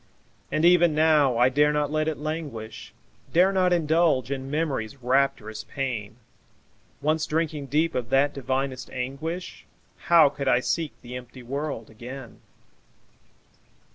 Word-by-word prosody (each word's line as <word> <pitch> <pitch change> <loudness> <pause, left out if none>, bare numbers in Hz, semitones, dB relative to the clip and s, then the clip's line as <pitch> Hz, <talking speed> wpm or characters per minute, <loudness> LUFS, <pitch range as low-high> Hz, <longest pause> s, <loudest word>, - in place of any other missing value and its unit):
And 155 - +1
even 175 -2 +5
now, 150 -5 +4
I 125 +2 +5
dare 150 +3 +3
not 150 -1 0
let 155 0 0
it 160 - -1
languish, 140 -9 -6 0.4
Dare 185 +3 +4
not 185 -1 +2
indulge 160 -5 +2
in 135 -1 -4
Memory's 140 -5 -2
rapturous 125 -4 0
pain; 115 -6 -4 0.9
Once 155 +1 +1
drinking 155 -3 -2
deep 155 +5 +1
of 120 -3 -3
that 140 +2 +3
divinest 135 0 -3
anguish, 140 +8 -5 0.4
How 170 -3 +7
could 140 0 -4
I 125 -2 +4
seek 155 +4 -2
the 125 +1 -8
empty 125 0 -10
world 135 -3 -4
again? 120 +2 -10
140 Hz, 135 wpm, -25 LUFS, 125-155 Hz, 0.9 s, How